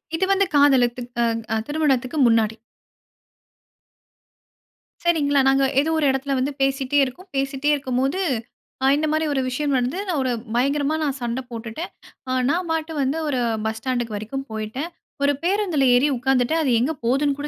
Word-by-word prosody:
இது 380 - +1
வந்து 390 0 +3
காதலித்து 255 -4 +4 0.2
அ - - +3 0.3
அ - - +2
திருமணத்துக்கு 290 -3 0
முன்னாடி. 225 -1 +2 2.5
சரிங்களா, 290 -5 +2
நாங்க 270 0 +4 0.2
ஏதோ 295 +3 +1
ஒரு 310 - +1
இடத்துல 270 +1 -1
வந்து 265 +3 0
பேசிட்டே 270 +1 +1
இருக்கோம். 355 +9 -10
பேசிட்டே 275 +1 -1
இருக்கும்போது 270 +4 -1 0.7
அ - - +5
இந்த 305 +2 0
மாதிரி 310 +1 +1
ஒரு 270 - +1
விஷயம் 285 +2 -1
வந்து 250 +7 -1
நான் 340 -6 0
ஒரு 255 - 0 0.2
பயங்கரமா 280 +4 +1
நான் 280 -2 -1
சண்டை 240 +2 -2
போட்டுட்டேன். 230 +8 -6 0.4
அ - - -1 0.2
நான் 350 +2 0
பாட்டு 320 0 -2
வந்து 270 +3 0
ஒரு 265 -3 0 0.3
பஸ் 220 0 -1
ஸ்டாண்ட்‌க்கு 240 -4 -2
வரைக்கும் 270 +6 -5
போயிட்டேன். 220 +9 -4 0.3
ஒரு 285 0 +3
பேருந்துல 360 -7 +1
ஏறி 275 +4 +3
உட்கார்ந்துட்டேன், 265 +5 +1
அது 265 - +1
எங்கே 305 +6 0
போதுனு 275 +4 +2
கூட 295 - -3
275 Hz, 160 wpm, -22 LUFS, 250-300 Hz, 2.5 s, அ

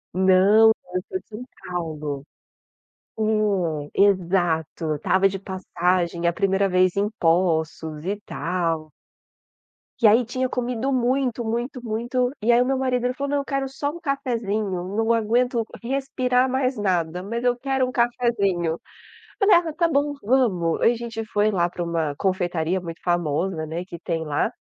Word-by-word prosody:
Não, 190 +4 +6 0.2
eu 185 - 0
sou 375 - -2
de - - -27
São 220 +3 -8 0.2
Paulo, 155 -5 -4 1.7
é - - +1
exato, 175 -5 +1
eu 155 -1 0
estava 190 +6 +3
de 195 0 -4
passagem 180 -2 -1
a 170 - +2
primeira 195 0 +1
vez 185 0 +3
em 200 +1 +1
Poços 160 -2 0
e 200 +2 -1
tal. 165 -5 -2 1.1
E 230 - +7
aí 230 +4 +5
tinha 255 +2 -2
comido 250 +1 -2
muito, 250 -1 0
muito, 240 +3 -2
muito, 240 +3 -1
e 225 +3 +3
aí 240 +1 +5
o - - +2
meu 265 +1 +1
marido 255 -2 0
ele 250 - +1
falou: 280 +2 -4
"Não, 290 - +1
eu 280 - -4
quero 275 -1 -2
só 285 +2 -3
um 340 - -9
cafezinho, 230 - -2 0.3
não 225 +1 +2
aguento 235 +2 +1 0.2
respirar 255 0 +1
mais 260 0 0
nada, 180 -5 -1
mas 230 +4 -4
eu 245 -1 +3
quero 265 0 0
um - - -4
cafezinho". 205 -9 0 0.6
Falei: 400 -2 +6
"Ah 340 -1 0
está 335 +2 +1
bom, 290 -1 +1
vamos". 200 -9 +1
A - - +5
gente 230 -1 -5
foi 210 0 +1
lá 175 -3 +1
pra 175 - -4
uma 165 -4 -1
confeitaria 180 -2 0
muito 170 -2 -8
famosa, 170 0 0
né, 165 +3 -4
que 175 -2 -9
tem 165 -1 -3
lá, 150 +9 0
205 Hz, 165 wpm, -23 LUFS, 175-250 Hz, 1.7 s, E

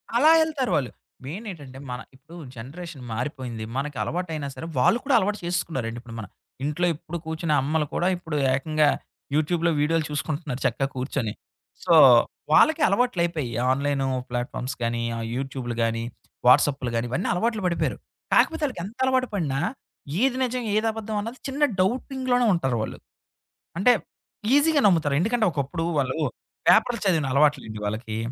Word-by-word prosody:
అలా 285 +6 +6
ఎళ్తారు 295 -5 -1
వాళ్ళు. 130 -4 0 0.4
మెయిన్ 185 - -6
ఏంటంటే 140 -6 -11
మన 125 - -4 0.2
ఇప్పుడు 150 +6 -15 0.2
జనరేషన్ 145 +5 -8
మారిపోయింది. 120 -2 -4
మనకి 140 -1 -3
అలవాటైనా 160 -5 -3
సరే! 130 - -7
వాళ్ళు 230 - +4
కూడా 270 - +3
అలవాటు 205 +2 0
చేసకున్నారండి. 130 -10 -2
ఇప్పుడు 120 -2 -10
మన, 105 - -6 0.4
ఇంట్లో 150 +5 0
ఎప్పుడు 170 +2 -7
కూర్చునే 160 -1 -1
అమ్మలు 150 +2 0
కూడా 175 - +1
ఇప్పుడు 160 -3 -6 0.2
ఏకంగా 155 +2 +2 0.5
యూట్యూబ్‌లో 165 +2 +2
వీడియోలు 155 +1 +1
చూసుకుంటున్నారు 150 -2 -3
చక్కగా 130 +2 +1
కూర్చొని. 125 -4 -2 0.5
సో 170 - +4 0.6
వాళ్ళకి 315 - +5
అలవాట్లు 200 -3 +1
అయిపోయాయి. 155 -8 -2 0.2
ఆన్‌లైను 140 0 0 0.2
ప్లాట్‌ఫామ్స్ 125 +1 -3
గాని, 115 0 -1
ఆ - - -4 0.2
యూట్యూబులు 130 -2 -4
గాని, 115 0 0 0.4
వాట్సాప్పులు 130 -1 +4
గాని 115 +1 0
ఇవన్నీ 175 +9 -1
అలవాట్లు 220 +2 0
పడిపోయారు. 170 - -1 0.4
కాకపోతే 325 -2 +3
ఆళ్ళకెంత 215 -2 -7
అలవాటు 260 -1 +2
పడినా 145 -8 -1 0.6
ఏది 260 -1 +2
నిజం, 250 0 -1
ఏది 215 +1 +2
అబద్ధం 220 -1 -5
అన్నది 230 +4 -7
చిన్న 280 +2 -1 0.2
డౌటింగ్‌లోనే 250 +3 +1
ఉంటారు 135 -9 0
వాళ్ళు. - - -6 0.8
అంటే 200 +7 +5 0.6
ఈజీగా 290 0 +4
నమ్ముతారు. 160 -6 +2
ఎందుకంటే 225 +2 +1
ఒకప్పుడు 155 +3 -2 0.2
వాళ్ళు 130 +1 -1 0.5
పేపర్‌లు 235 +1 +4
చదివిన 160 -6 +2
అలవాటులెండి 140 -7 +2
వాళ్ళకి. 110 +1 -3
155 Hz, 145 wpm, -25 LUFS, 130-210 Hz, 0.8 s, అలా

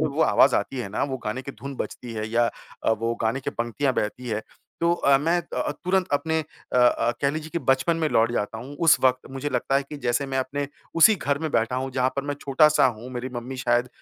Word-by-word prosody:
में 155 - +2
वो 145 +3 0
आवाज़ 140 - +5
आती 135 - -2
है 105 - -3
ना, 105 - -2
वो 135 -2 -3
गाने 110 +5 -3
की 140 - -7
धुन 135 +5 -8
बजती 120 -2 -6
है 110 -1 -3
या 120 +1 +2 0.4
अ, - - +3
वो 115 +1 0
गाने 115 +5 0
की 145 - -3
पंक्तियाँ 125 +3 -1
बहती 120 +4 -3
हैं। 110 -1 -1 0.4
तो 170 0 +3
अ, 140 -4 +4
मैं 165 +5 +1 0.2
अ, - - 0
तुरंत 185 0 +1
अपने 160 +2 +1
अ 150 -4 -8
अ, 120 -1 +4
कह 140 -1 +2
लीजिए 155 +1 -5
कि 170 - 0
बचपन 135 +6 +2
में 160 -2 0
लौट 115 +1 +3
जाता 110 -1 -2
हूँ। 135 +5 -9
उस 160 - +8
वक़्त 130 0 +2
मुझे 135 +2 -3
लगता 125 +1 -1
है 140 - +1
कि 150 - -5
जैसे 125 +3 +1
मैं 135 0 -2
अपने 140 +2 -2 0.3
उसी 190 +7 +7
घर 140 -3 -1
में 160 0 -3
बैठा 120 0 +1
हूँ 130 +1 -2
जहाँ 130 0 +1
पर 140 - 0
मैं 145 0 -2
छोटा-सा 150 +2 +4
हूँ। 120 +1 -4
मेरी 125 +1 -3
मम्मी 125 +2 -5
शायद 120 0 +1
130 Hz, 250 wpm, -25 LUFS, 120-145 Hz, 0.4 s, उस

